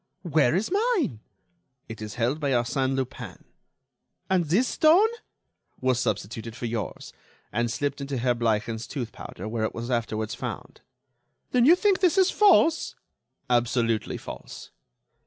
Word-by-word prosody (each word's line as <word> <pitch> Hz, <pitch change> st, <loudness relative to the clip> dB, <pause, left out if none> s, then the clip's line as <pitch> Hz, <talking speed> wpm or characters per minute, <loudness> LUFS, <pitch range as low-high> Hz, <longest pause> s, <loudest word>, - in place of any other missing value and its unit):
"Where 155 Hz, -5 st, +2 dB
is 205 Hz, -, -1 dB
mine?" 400 Hz, -, +1 dB, 0.7 s
"It 110 Hz, -1 st, -8 dB
is 110 Hz, +2 st, -6 dB
held 125 Hz, +5 st, 0 dB
by 145 Hz, -3 st, -1 dB
Arsène 130 Hz, +2 st, 0 dB
Lupin." 130 Hz, -1 st, -5 dB, 0.9 s
"And 180 Hz, -3 st, +3 dB
this 195 Hz, -, +2 dB
stone?" 350 Hz, +8 st, +5 dB, 0.7 s
"Was 130 Hz, -2 st, +1 dB
substituted 115 Hz, -1 st, -3 dB
for 120 Hz, -, -5 dB
yours, 115 Hz, -4 st, -5 dB, 0.4 s
and 120 Hz, 0 st, 0 dB
slipped 140 Hz, +3 st, -2 dB
into 140 Hz, -1 st, -3 dB
Herr 125 Hz, +1 st, +2 dB
Bleichen's 115 Hz, -1 st, -1 dB
tooth 120 Hz, -5 st, -5 dB
powder, 95 Hz, -, -8 dB
where 110 Hz, 0 st, -2 dB
it 110 Hz, -, -2 dB
was 120 Hz, +2 st, -4 dB
afterwards 110 Hz, -2 st, -1 dB
found." -, -, -7 dB, 0.7 s
"Then 245 Hz, -1 st, +4 dB
you 330 Hz, +5 st, +8 dB
think 395 Hz, 0 st, +2 dB
this 365 Hz, -1 st, +3 dB
is 380 Hz, -1 st, +5 dB
false?" 370 Hz, -6 st, +4 dB, 0.5 s
"Absolutely 120 Hz, -2 st, +1 dB
false." -, -, -10 dB
125 Hz, 140 wpm, -26 LUFS, 115-195 Hz, 0.9 s, you